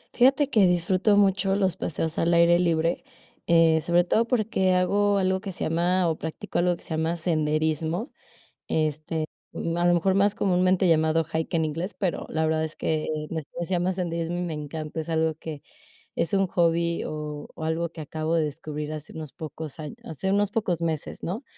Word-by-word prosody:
Fíjate 270 +3 +4
que 215 -8 +4
disfruto 185 +4 +2
mucho 195 -1 +3
los 190 -3 +1
paseos 165 -2 -2
al 170 +1 +3
aire 170 +1 +5
libre. 165 -1 +1 0.4
Eh, 165 -2 +5
Sobre 175 +2 +3
todo 220 +6 +2
porque 215 -6 +1
hago 200 +3 +2
algo 190 -1 +1
que 195 - -5
se - - -5
llama 175 +3 +2
o 160 -1 0
practico 160 +1 -4
algo 175 0 +2
que - - -17
se - - -12
llama 160 +1 0
senderismo. 160 - 0 0.6
Este, 155 0 -1 0.3
ma 170 +1 -2
a - - +4
lo 175 - +5
mejor, 185 +3 +2
más 200 +1 +3
comúnmente 185 -2 +2
llamado 160 0 +3
hike 160 +1 -1
en 160 -1 +2
inglés, 165 +6 -4
pero 185 -4 -2
la 160 0 0
verdad 160 0 +1
es 155 - -7
que, 155 -1 -1 0.2
en - - -5
español 160 +3 -5
se - - -8
llama 180 +1 +1
senderismo, 170 -1 -2
y - - -1
me 175 -2 -3
encanta. 155 +1 -5
Es 160 +1 -5
algo 160 0 +1
que, 155 -2 -8 0.5
es 170 - 0
un 195 -1 +3
hobby, 170 -1 +1
o 150 -1 -5
o 160 - -7
algo 165 +1 -1
que 165 - -8
acabo 155 +2 -2
de 165 - +3
descubrir, 150 0 -5
hace 155 0 -7
unos 155 -4 -7
pocos 155 -1 -7
añ 150 -2 -6
hace 190 +5 -3
unos 205 0 +2
pocos 195 -6 0
meses, 160 -3 -3
¿no?, 195 +10 -3
170 Hz, 195 wpm, -26 LUFS, 160-185 Hz, 0.6 s, aire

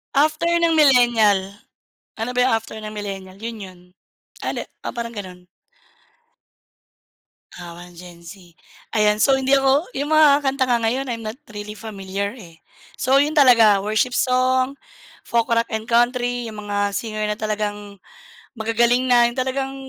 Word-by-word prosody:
After 310 +3 +2
ng 335 -1 +2
millennial, 235 -9 +3 0.6
ano 225 +3 -3
ba 250 -2 +2
after 225 - -10
ng 215 - -6
millennial? 195 -2 -7
Yun 230 +1 -6
yun. 185 -2 -11 0.6
Ale - - -4 0.2
oh, - - -5
parang 235 -1 -6
ganun. 185 -4 -9 2.1
Ah, 175 -1 -9
1 175 0 -13
Gen-Z, 175 0 -13 0.4
ayan. 210 -1 +2
So, 270 +5 +3
hindi 265 +1 +3
ako 275 +4 +2
yung 290 +3 -1
mga 300 -2 +6
kanta 265 -1 0
nga 240 - +3
ngayon, 255 +3 -1
I'm 230 -2 -5
not 220 +6 -6
really 210 0 -7
familiar 200 -2 -5
eh. 165 -6 -15 0.3
So, 265 +2 +1
'yon 295 +2 +2
talaga, 230 -8 +5
worship 215 +4 0
song, 255 +1 +1 0.5
folk, 235 +1 0
rock 230 0 +2
and 220 +2 -4
country. 245 0 +1
Yung 215 -2 -8
mga 205 -1 -2
singer 215 -1 -3
na 210 - -1
talagang 210 -1 -4 0.6
magagaling 235 +2 +1
na, 240 -1 +5
yung 240 +2 -3
talagang 265 +1 -2
230 Hz, 150 wpm, -21 LUFS, 205-260 Hz, 2.1 s, mga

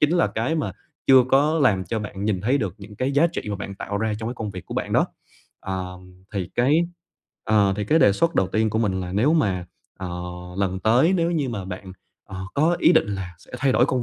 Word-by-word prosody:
chính 150 - +4
là 170 - +4
cái 120 +9 -1
mà 140 - -1 0.3
chưa 130 -2 +7
có 150 +4 +4
làm 95 -8 +3
cho 110 +5 -2
bạn 100 -1 -5
nhìn 105 -4 0
thấy 125 +8 +2
được 100 -7 -2
những 105 +1 -11
cái 130 +5 -1
giá 145 +4 +5
trị 170 - -4
mà 100 - -2
bạn 100 0 -6
tạo 100 +1 -4
ra 110 0 0
trong 110 - -4
cái 120 - -4
công 110 -3 -4
việc 90 -3 -9
của - - -6
bạn - - -2
đó. - - +4 0.5
Ờm, 90 0 -7
thì 95 -3 -3
cái, 150 +8 +3 0.6
ờ, 105 -3 +3
thì 105 - -2
cái 155 +10 +3
đề 100 - +6
xuất 170 +10 +1
đầu 95 - +3
tiên 110 +1 +1
của 110 - 0
mình 95 -4 0
là 90 0 -5
nếu 120 +11 +3
mà, 95 - +1 0.3
ờ, 95 -2 -5 0.5
lần 95 -1 0
tới 125 - +4
nếu 170 -1 +1
như 150 -6 0
mà 105 -5 -4
bạn, 95 0 -7 0.3
ờ, 95 - -9 0.2
có 160 +4 +3
ý 170 - +6
định 160 - +4
là 95 -3 -4
sẽ - - -20
thay 135 -1 +2
đổi 125 - +4
công 130 -3 0
105 Hz, 250 wpm, -23 LUFS, 95-135 Hz, 0.6 s, chưa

